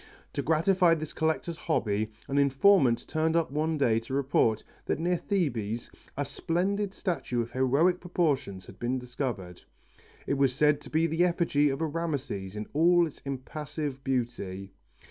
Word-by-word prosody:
To 140 - -1
gratify 165 +3 +3
this 155 -1 -6
collector's 160 +1 -1
hobby 110 -10 -1 0.2
an 140 +1 +1
informant 140 -2 +4
turned 160 +1 0
up 165 -4 +1
one 155 +2 0
day 115 -6 +3
to 115 +4 -5
report 130 -5 +2 0.2
that - - 0
near 175 +3 +1
Thebes 120 - -2 0.3
a 145 - 0
splendid 190 +8 -1
statue 175 -11 -2
of 120 0 -2
heroic 140 +8 +2
proportions 145 - -1
had 95 - -14
been 120 +2 -1
discovered. 120 -8 -5 0.6
It 140 - -1
was 135 -2 +3
said 150 +1 +3
to 140 - -11
be 160 +1 +2
the 165 +2 +2
effigy 170 -5 +2
of 135 +3 -3
a - - +2
Rameses 140 - -3
in 105 0 -4
all 170 +3 +5
its 155 - -9
impassive 140 +1 -5
beauty. 115 -7 -3
145 Hz, 160 wpm, -28 LUFS, 125-165 Hz, 0.6 s, all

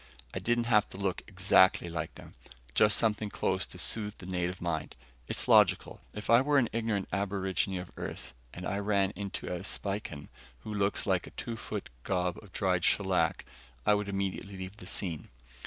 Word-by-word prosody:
I - - -2
didn't 120 0 +1
have 110 -3 +3
to - - -9
look 95 -2 -1
exactly 95 -2 +4
like 85 0 -4
them, - - -11 0.4
just 105 - +5
something 110 -2 +1
close, 95 -1 0
to - - -10
soothe 105 +3 -1
the 90 - -10
native 90 0 -2
mind. 85 -3 -3 0.3
It's - - -1
logical. - - +4
If 105 - -7
I 115 +2 +7
were 145 +1 +3
an 125 -4 +3
ignorant 110 -4 0
aborigine 95 -1 0
of 90 0 -7
Earth - - -6 0.2
and 90 - -7
I 100 0 -1
ran 100 -1 +2
into 100 0 -5
a 90 - -3
Spican, 95 -8 -4 0.3
who 105 - -6
looks 100 -1 +1
like 95 -3 +1
a - - -14
two 115 - -4
foot 110 - -5
gob 90 -2 0
of 105 -3 -15
dried 90 -3 +1
shellac, 95 -1 +2 0.4
I - - +6
would 105 -1 0
immediately 100 0 -3
leave 95 +2 -7
the 90 - -10
scene. 85 -5 -4
100 Hz, 185 wpm, -31 LUFS, 90-105 Hz, 0.4 s, I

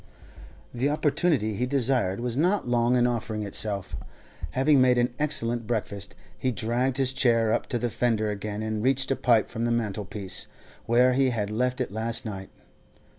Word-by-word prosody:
The 125 +4 0
opportunity 150 -6 +1
he 125 +5 -1
desired 125 -7 +1
was 120 -1 -2
not 180 +4 +1
long 120 0 +2
in 120 -1 +3
offering 110 -3 -2
itself. 100 -1 -2 0.6
Having 135 +1 +4
made 125 -1 +4
an 120 0 +1
excellent 120 -6 0
breakfast, 100 -4 -3 0.2
he 130 - -1
dragged 125 +3 -1
his 135 -1 +1
chair 115 -4 +2
up - - -1
to 125 - -1
the 120 -1 -2
fender 110 -3 0
again, 105 +1 -4
and 110 -1 -2
reached 130 +2 +2
a - - +3
pipe 115 -4 +3
from 115 - -4
the 120 - 0
mantel 105 -3 -2
piece, 95 0 -3 0.4
where 125 +2 +4
he 135 0 +3
had 105 -4 -2
left 125 +3 -1
it 125 - -2
last 115 +3 -1
night. 95 -3 -6
120 Hz, 180 wpm, -26 LUFS, 110-130 Hz, 0.6 s, Having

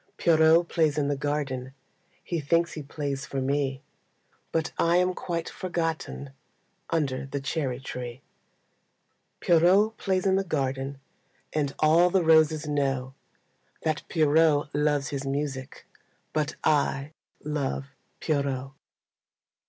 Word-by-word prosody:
Pierrot 165 +1 +5
plays 155 -4 +1
in 145 -1 +1
the 145 - +1
garden, 135 -2 -3 0.5
He 170 - -2
thinks 170 +4 +1
he 155 - -5
plays 140 0 -4
for 135 - -3
me, 135 0 -1 0.7
But 160 -1 -1
I 170 +1 +3
am 180 0 +2
quite 170 -2 -3
forgotten 165 -5 -3 0.6
Under 140 -5 -1
the 140 +1 -3
cherry 135 -2 -2
tree. 125 -1 -7 1.2
Pierrot 185 +6 +4
plays 190 -1 0
in 190 0 +3
the 195 - +1
garden, 135 -4 -2 0.5
And 145 -3 -1
all 165 +3 +5
the 185 0 +2
roses 160 -1 +4
know 135 -3 -1 0.7
That 155 -1 0
Pierrot 155 -2 +3
loves 145 -2 +1
his 140 -1 -3
music, 135 -1 -4 0.5
But 150 -1 -1
I 145 -1 +1 0.3
love 145 -3 -2 0.4
Pierrot. 140 -3 -1
150 Hz, 120 wpm, -27 LUFS, 135-165 Hz, 1.2 s, Pierrot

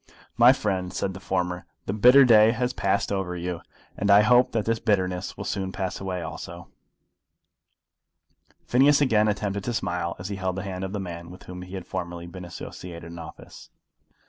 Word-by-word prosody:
"My 120 +2 +7
friend," 95 -8 -1
said 95 0 -2
the 95 - -8
former, 90 -1 -2 0.2
"the 95 - -2
bitter 125 +6 +7
day 110 -2 +6
has 125 +1 -1
passed 100 +1 0
over 95 -3 -2
you, 85 -1 -4 0.3
and 100 - -2
I 100 +1 +8
hope 125 +3 +4
that 110 -2 -1
the 115 0 0
bitterness 95 -5 0
will - - -5
soon 95 -1 -2
pass 95 -1 -4
away 90 -2 -3
also." - - -8 2.0
Phineas 140 +4 +4
again 110 -7 +3
attempted 100 -1 -2
to 120 - -2
smile 90 -5 -2
as 95 +2 -6
he 100 - -4
held 95 -1 -2
the 95 - -4
hand 95 -1 -5
of 95 +1 -4
the 105 - -2
man 85 -3 -7
with 90 - -12
whom 90 0 -9
he 90 +1 -8
had 95 - -6
formerly 85 -2 -5
been 90 +1 -9
associated 85 -1 -9
in 85 - -9
office. 80 - -11
95 Hz, 190 wpm, -25 LUFS, 90-105 Hz, 2.0 s, I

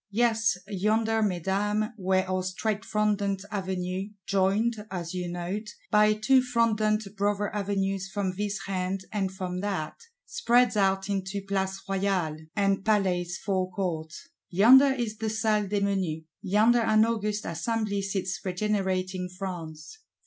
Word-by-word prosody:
Yes, 225 -2 +2
yonder, 220 +3 +1
Mesdames, 205 +2 0
where 190 -2 +1
our 185 0 0
straight 200 +3 -2
frondent 205 -2 0
Avenue, 190 -1 -3 0.2
joined, 210 +3 +1
as 175 -2 -5
you 180 -1 -3
note, 185 +5 -4 0.2
by 210 0 +5
Two 255 +5 +4
frondent 220 -3 +1
brother 205 0 0
Avenues 195 -1 -1
from 190 -2 -2
this 205 +1 -2
hand 190 0 -2
and 195 -3 -1
from 185 -1 -4
that, 190 -6 -2 0.3
spreads 245 0 +2
out 195 -1 +2
into 195 0 -2
Place 195 -1 -2
Royale 190 -5 0 0.2
and 195 -1 +1
Palace 185 -4 +1
Forecourt; 185 -5 -2 0.4
yonder 245 +10 +7
is 235 -5 -2
the 220 -1 -1
Salle 215 -1 +1
des 205 +1 0
Menus. 190 -6 -1 0.2
Yonder 215 +4 +4
an 220 -1 +4
august 215 -2 -1
Assembly 200 +4 -1
sits 190 -1 -2
regenerating 185 -1 -1
France. 175 - -7
195 Hz, 130 wpm, -27 LUFS, 185-215 Hz, 0.4 s, yonder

